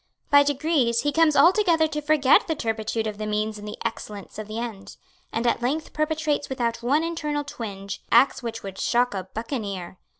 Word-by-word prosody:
By 285 Hz, 0 st, +8 dB
degrees 285 Hz, -4 st, +1 dB
he 290 Hz, -, 0 dB
comes 320 Hz, -1 st, +3 dB
altogether 340 Hz, -3 st, +5 dB
to 300 Hz, -1 st, -3 dB
forget 295 Hz, -3 st, +4 dB
the 320 Hz, -, 0 dB
turpitude 225 Hz, -3 st, -2 dB
of 215 Hz, -1 st, -4 dB
the 215 Hz, -, -3 dB
means 215 Hz, 0 st, -1 dB
in 205 Hz, -, -9 dB
the 210 Hz, -, -6 dB
excellence 210 Hz, -3 st, -6 dB
of 215 Hz, -, -6 dB
the 215 Hz, +1 st, -6 dB
end, 215 Hz, -4 st, -6 dB, 0.3 s
and 230 Hz, +1 st, -2 dB
at 235 Hz, -, +1 dB
length 290 Hz, +6 st, -2 dB
perpetrates 305 Hz, -1 st, -1 dB
without 235 Hz, -3 st, -2 dB
one 280 Hz, +7 st, +2 dB
internal 300 Hz, -3 st, -2 dB
twinge 200 Hz, -7 st, -6 dB
acts 235 Hz, +5 st, +5 dB
which 230 Hz, -1 st, -5 dB
would 195 Hz, -1 st, -7 dB
shock 245 Hz, 0 st, +2 dB
a 190 Hz, -2 st, -4 dB
buccaneer. 205 Hz, -6 st, -5 dB
240 Hz, 190 wpm, -24 LUFS, 215-300 Hz, 0.3 s, By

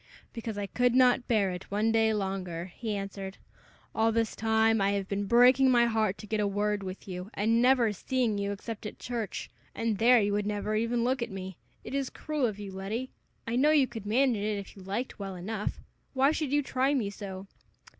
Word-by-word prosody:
"Because 225 Hz, -3 st, -5 dB
I 205 Hz, -, -2 dB
could 245 Hz, +4 st, +1 dB
not 255 Hz, -1 st, +4 dB
bear 205 Hz, -5 st, +2 dB
it 180 Hz, +1 st, -7 dB
one 210 Hz, +3 st, +1 dB
day 225 Hz, 0 st, +3 dB
longer," 190 Hz, -4 st, -3 dB
he 220 Hz, -3 st, -3 dB
answered. 195 Hz, -1 st, -6 dB, 0.6 s
"All 225 Hz, +1 st, +2 dB
this 225 Hz, 0 st, 0 dB
time 220 Hz, -1 st, +2 dB
I 200 Hz, +1 st, +2 dB
have 200 Hz, -1 st, -2 dB
been 200 Hz, 0 st, -2 dB
breaking 250 Hz, +4 st, +6 dB
my 240 Hz, -2 st, +5 dB
heart 220 Hz, -4 st, +1 dB
to -, -, -9 dB
get 215 Hz, +1 st, -2 dB
a 205 Hz, -, +2 dB
word 205 Hz, +1 st, 0 dB
with 185 Hz, +1 st, -7 dB
you, 180 Hz, +1 st, -6 dB
and 225 Hz, +3 st, +2 dB
never 245 Hz, -4 st, +4 dB
seeing 230 Hz, 0 st, -1 dB
you 200 Hz, 0 st, -1 dB
except 215 Hz, +2 st, -6 dB
at -, -, -9 dB
church, 230 Hz, -5 st, -4 dB, 0.2 s
and 225 Hz, -3 st, -1 dB
there 245 Hz, +2 st, +6 dB
you 205 Hz, -1 st, +1 dB
would 205 Hz, 0 st, 0 dB
never 210 Hz, 0 st, -2 dB
even 230 Hz, +2 st, 0 dB
look 255 Hz, +1 st, 0 dB
at 235 Hz, -, -2 dB
me. 190 Hz, -1 st, -6 dB, 0.3 s
It -, -, -8 dB
is 275 Hz, -1 st, -1 dB
cruel 300 Hz, -5 st, -1 dB
of 210 Hz, -3 st, -4 dB
you, 205 Hz, -2 st, -7 dB
Letty. 205 Hz, +7 st, -4 dB, 0.3 s
I 230 Hz, -, -2 dB
know 275 Hz, +5 st, +4 dB
you 300 Hz, -3 st, +5 dB
could 225 Hz, -5 st, -8 dB
manage 240 Hz, -1 st, +2 dB
it, 210 Hz, 0 st, -1 dB
if 200 Hz, -2 st, -8 dB
you 195 Hz, -, -12 dB
liked, 205 Hz, +7 st, -4 dB
well 195 Hz, -2 st, -5 dB
enough. 205 Hz, +4 st, -4 dB, 0.4 s
Why 270 Hz, +2 st, +4 dB
should 305 Hz, -3 st, -2 dB
you 290 Hz, 0 st, +2 dB
try 265 Hz, +2 st, +1 dB
me 215 Hz, -7 st, -1 dB
so?" 195 Hz, -2 st, -7 dB
220 Hz, 215 wpm, -29 LUFS, 200-240 Hz, 0.6 s, breaking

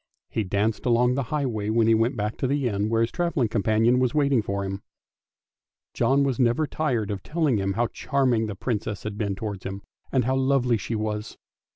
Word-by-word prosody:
He 110 Hz, -, 0 dB
danced 105 Hz, +5 st, -1 dB
along 125 Hz, +1 st, +3 dB
the 140 Hz, -, 0 dB
highway, 120 Hz, -9 st, -1 dB
when 115 Hz, +1 st, +3 dB
he 115 Hz, -, +5 dB
went 115 Hz, +3 st, +1 dB
back 105 Hz, +1 st, -2 dB
to 130 Hz, -, -1 dB
the 140 Hz, -1 st, 0 dB
inn 105 Hz, -1 st, -1 dB
where 115 Hz, 0 st, +2 dB
his 115 Hz, -, +1 dB
travelling 170 Hz, -9 st, 0 dB
companion 115 Hz, +3 st, +2 dB
was 125 Hz, +2 st, +1 dB
waiting 140 Hz, -5 st, +3 dB
for 100 Hz, -1 st, -3 dB
him. 95 Hz, +1 st, -4 dB, 1.1 s
John 140 Hz, +1 st, +2 dB
was 135 Hz, -4 st, -1 dB
never 125 Hz, +5 st, +3 dB
tired 130 Hz, -9 st, -1 dB
of 100 Hz, -2 st, -4 dB
telling 150 Hz, -, 0 dB
him 95 Hz, 0 st, -1 dB
how 120 Hz, +4 st, +1 dB
charming 125 Hz, -2 st, 0 dB
the 105 Hz, -, -5 dB
Princess 105 Hz, -2 st, -3 dB
had 105 Hz, -1 st, -4 dB
been 100 Hz, -2 st, -2 dB
towards 100 Hz, -2 st, -5 dB
him, 95 Hz, +1 st, -6 dB, 0.3 s
and 130 Hz, -4 st, +2 dB
how 130 Hz, +1 st, +1 dB
lovely 130 Hz, -3 st, +2 dB
she 110 Hz, +3 st, -4 dB
was. 105 Hz, 0 st, -3 dB
115 Hz, 205 wpm, -25 LUFS, 105-130 Hz, 1.1 s, he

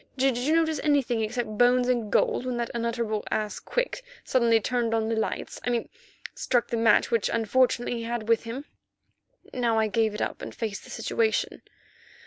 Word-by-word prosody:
Did 265 Hz, -1 st, +2 dB
you 265 Hz, +7 st, +1 dB
notice 320 Hz, -1 st, +2 dB
anything 275 Hz, -6 st, +2 dB
except 220 Hz, -1 st, -3 dB
bones 245 Hz, 0 st, +4 dB
and 235 Hz, -4 st, 0 dB
gold -, -, +2 dB
when 250 Hz, -1 st, -2 dB
that 235 Hz, -1 st, -2 dB
unutterable 230 Hz, -2 st, -2 dB
ass, 215 Hz, -1 st, -2 dB
Quick, -, -, -2 dB, 0.2 s
suddenly 235 Hz, -3 st, +3 dB
turned 235 Hz, 0 st, 0 dB
on 220 Hz, 0 st, 0 dB
the 225 Hz, -, 0 dB
lights—I 220 Hz, +2 st, -3 dB
mean 235 Hz, -2 st, -1 dB, 0.4 s
struck 245 Hz, -2 st, 0 dB
the -, -, -1 dB
match 225 Hz, 0 st, +4 dB
which 230 Hz, -3 st, +2 dB
unfortunately 240 Hz, +2 st, +1 dB
he -, -, -5 dB
had 230 Hz, -2 st, -3 dB
with 230 Hz, 0 st, +2 dB
him." 250 Hz, +5 st, -6 dB, 0.9 s
Now 235 Hz, -3 st, +1 dB
I 220 Hz, -, +3 dB
gave 220 Hz, 0 st, +1 dB
it -, -, -4 dB
up -, -, -4 dB
and -, -, -7 dB
faced 220 Hz, -4 st, -4 dB
the -, -, -13 dB
situation. 450 Hz, -1 st, -1 dB
235 Hz, 180 wpm, -26 LUFS, 225-250 Hz, 0.9 s, bones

